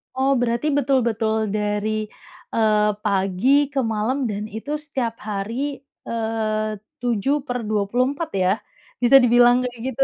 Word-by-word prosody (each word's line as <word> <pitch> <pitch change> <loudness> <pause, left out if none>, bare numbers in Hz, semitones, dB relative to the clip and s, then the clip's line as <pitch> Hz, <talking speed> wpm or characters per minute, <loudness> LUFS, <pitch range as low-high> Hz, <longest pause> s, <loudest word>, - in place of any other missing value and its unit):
Oh, 265 +1 +2
berarti 240 +5 0
betul-betul 230 -6 +1
dari, 210 +1 -1 0.5
eee, 215 -1 +3
pagi 205 +8 +2
ke 275 -1 -1
malam 225 +5 -1
dan 205 +1 -4
itu 255 +8 -5
setiap 260 -6 -4
hari, 230 +8 -4 0.2
eee, 220 -1 -1 0.3
7/24, 245 - -1
ya, 190 0 +2 0.5
bisa 270 +3 +8
dibilang 245 0 +5
kayak 245 -1 -10
gitu. 270 +2 +1
230 Hz, 115 wpm, -22 LUFS, 215-265 Hz, 0.5 s, bisa